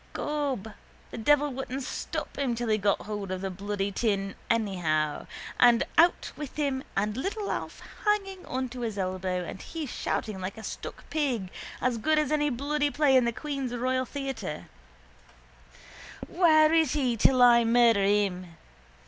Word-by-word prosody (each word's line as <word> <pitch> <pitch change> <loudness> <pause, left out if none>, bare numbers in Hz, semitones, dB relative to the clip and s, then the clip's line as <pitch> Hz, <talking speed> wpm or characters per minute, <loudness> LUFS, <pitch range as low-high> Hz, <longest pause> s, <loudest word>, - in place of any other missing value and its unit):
Gob, 275 -8 -2 0.4
the - - -6
devil 295 +5 +3
wouldn't 265 +1 -4
stop - - -5
him 265 -4 -1
till 235 0 -3
he 215 0 +2
got 200 0 +1
hold 205 -2 -5
of 185 0 -3
the 195 0 -3
bloody 200 +1 -3
tin 195 -2 -1 0.2
anyhow 175 -9 0 0.3
and 240 -1 +6
out 340 +2 +4
with 295 -3 -7
him 275 -3 -1
and 210 +1 0
little 395 - -3
Alf - - -5 0.2
hanging 390 -3 0
on 260 0 -2
to 250 +1 -8
his 225 -4 -3
elbow 185 -1 -2
and 190 - -7
he 325 -2 -5
shouting 215 -6 -3
like 190 +4 -5
a 220 - -9
stuck - - -7
pig, 250 -12 -1 0.3
as 245 -2 0
good 310 +6 +2
as 305 -2 +1
any 295 -1 +2
bloody 290 +3 0
play 285 -2 +3
in 255 -2 +5
the 235 - +1
Queen's 270 -1 -4
royal 255 +1 0
theatre: 270 - -5 1.6
—Where 315 -3 +5
is 320 -5 +3
he 260 -5 +1
till 250 +3 +4
I 240 -1 +7
murder 230 -3 +4
him? 195 -4 0
245 Hz, 165 wpm, -28 LUFS, 200-290 Hz, 1.6 s, I